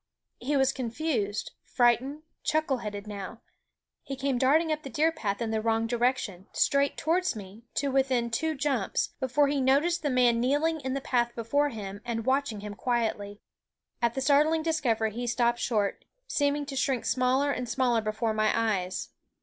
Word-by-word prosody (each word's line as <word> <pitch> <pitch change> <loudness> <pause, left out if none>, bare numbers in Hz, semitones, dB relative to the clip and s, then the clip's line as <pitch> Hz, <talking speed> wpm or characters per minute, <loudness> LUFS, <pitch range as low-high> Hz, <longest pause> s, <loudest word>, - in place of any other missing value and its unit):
He 280 +4 0
was 270 0 +3
confused, 235 -5 -2
frightened, 255 +5 +1 0.2
chuckle 310 -4 +1
headed 205 -2 -6
now; 205 +2 -7 0.6
he 275 - -6
came 270 -1 -1
darting 310 +5 +3
up 310 0 -1
the 275 - -8
deer 305 +7 +2
path 225 -9 -3
in 225 - -2
the 220 -1 0
wrong 225 0 +1
direction, 235 -5 -1
straight 280 0 +2
towards 350 -1 +1
me, 205 +2 -10
to 280 -1 0
within 260 -3 +1
two 315 +7 0
jumps, 270 -8 0
before 275 +2 +2
he 280 -1 0
noticed 290 +7 +2
the 295 - 0
man 245 -3 +3
kneeling 295 +6 +1
in 260 0 -2
the 275 - -2
path 240 -2 0
before 285 +6 +1
him 205 -4 -7
and 230 -2 -3
watching 260 -5 0
him 205 0 -6
quietly. 210 -3 -2 0.6
At 235 -1 +1
the 265 - -1
startling 300 +3 +3
discovery 245 -9 +1
he 240 +3 -4
stopped 240 0 +1
short, 210 -4 0 0.2
seeming 290 -8 0
to 280 -1 -6
shrink 260 -2 0
smaller 260 +3 +2
and 250 -3 -3
smaller 240 -1 +2
before 220 +1 -1
my 215 0 +2
eyes. 195 -5 -1
250 Hz, 175 wpm, -28 LUFS, 225-280 Hz, 0.6 s, was